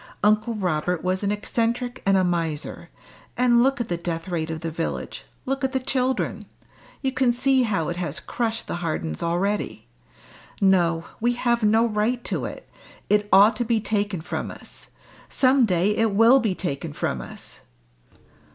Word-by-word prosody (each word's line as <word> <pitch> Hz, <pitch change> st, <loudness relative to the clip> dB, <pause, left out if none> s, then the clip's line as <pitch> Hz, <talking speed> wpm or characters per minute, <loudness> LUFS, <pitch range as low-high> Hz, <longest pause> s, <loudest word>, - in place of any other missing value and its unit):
Uncle 215 Hz, +2 st, +3 dB
Robert 180 Hz, -3 st, -1 dB
was 185 Hz, +1 st, 0 dB
an 200 Hz, -1 st, 0 dB
eccentric 235 Hz, +4 st, -2 dB
and 195 Hz, 0 st, +5 dB
a 190 Hz, -, +3 dB
miser; 165 Hz, -4 st, -2 dB, 0.5 s
and 240 Hz, -1 st, +4 dB
look 270 Hz, +2 st, +2 dB
at 240 Hz, -, -2 dB
the 175 Hz, -, -2 dB
death 170 Hz, 0 st, -4 dB
rate 165 Hz, -3 st, -2 dB
of 160 Hz, -1 st, -4 dB
the 165 Hz, -1 st, -3 dB
village 165 Hz, +1 st, -4 dB, 0.2 s
look 270 Hz, +1 st, -2 dB
at 265 Hz, 0 st, 0 dB
the 265 Hz, -, +1 dB
children; 255 Hz, 0 st, -1 dB, 0.6 s
you 265 Hz, -, +1 dB
can 255 Hz, -2 st, +2 dB
see 260 Hz, +2 st, +2 dB
how 195 Hz, -10 st, 0 dB
it 175 Hz, -, -3 dB
has 175 Hz, -1 st, -3 dB
crushed 230 Hz, -1 st, -3 dB
the -, -, -4 dB
Hardens 155 Hz, -, -3 dB
already. 190 Hz, -, -1 dB, 0.7 s
No, 175 Hz, -4 st, +3 dB, 0.2 s
we 240 Hz, +2 st, +2 dB
have 240 Hz, -1 st, +1 dB
no 220 Hz, +2 st, +4 dB
right 230 Hz, +2 st, 0 dB
to -, -, -2 dB
it! -, -, -8 dB, 0.4 s
it 205 Hz, 0 st, +2 dB
ought 205 Hz, +4 st, +7 dB
to 240 Hz, -, 0 dB
be 230 Hz, -1 st, +1 dB
taken 205 Hz, -4 st, -1 dB
from 160 Hz, -, -4 dB
us; -, -, -9 dB, 0.4 s
some 260 Hz, -2 st, +4 dB
day 185 Hz, +2 st, +2 dB
it 225 Hz, -2 st, +1 dB
will 230 Hz, +5 st, +7 dB
be 215 Hz, -7 st, 0 dB
taken 140 Hz, -, -4 dB
from 65 Hz, -, -2 dB
us!" -, -, -10 dB
210 Hz, 170 wpm, -24 LUFS, 175-240 Hz, 0.7 s, ought